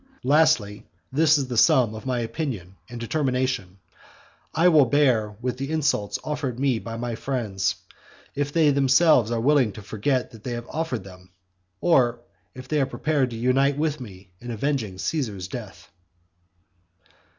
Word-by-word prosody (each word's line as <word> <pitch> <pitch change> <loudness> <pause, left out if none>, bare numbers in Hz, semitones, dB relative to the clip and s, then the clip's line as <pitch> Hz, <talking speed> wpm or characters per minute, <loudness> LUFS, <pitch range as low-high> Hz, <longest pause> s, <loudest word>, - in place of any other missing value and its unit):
"Lastly, 135 -8 +2 0.2
this 155 +2 +4
is 135 -2 -2
the 125 -2 -4
sum 120 -3 +4
of 110 +4 -8
my 125 -2 0
opinion 115 - -4
and 120 0 -7
determination; 125 -7 -1 0.7
I 165 +3 +3
will 155 -5 +6
bear 120 -7 +2
with 125 0 -2
the 135 +1 -4
insults 145 -10 0
offered 145 -5 -3
me 135 -4 +1
by 115 0 -7
my 120 0 -3
friends, 105 -7 -2 0.6
if 145 0 -2
they 155 -2 +4
themselves 135 -2 +4
are 115 -1 -1
willing 130 -3 +3
to 110 - -10
forget 125 +6 -1
that 110 -2 -14
they 125 - -4
have 120 0 -5
offered 160 -10 -3
them; 90 -1 -14 0.5
or 125 -8 +3 0.4
if 130 0 -10
they 150 -2 +1
are 135 - +1
prepared 145 -4 0
to 115 - -7
unite 135 +4 +2
with 155 -1 -1
me 95 -5 -11
in 120 - -8
avenging 115 -4 -2
Caesar's 105 - -3
death." - - -9
125 Hz, 160 wpm, -24 LUFS, 110-145 Hz, 0.7 s, will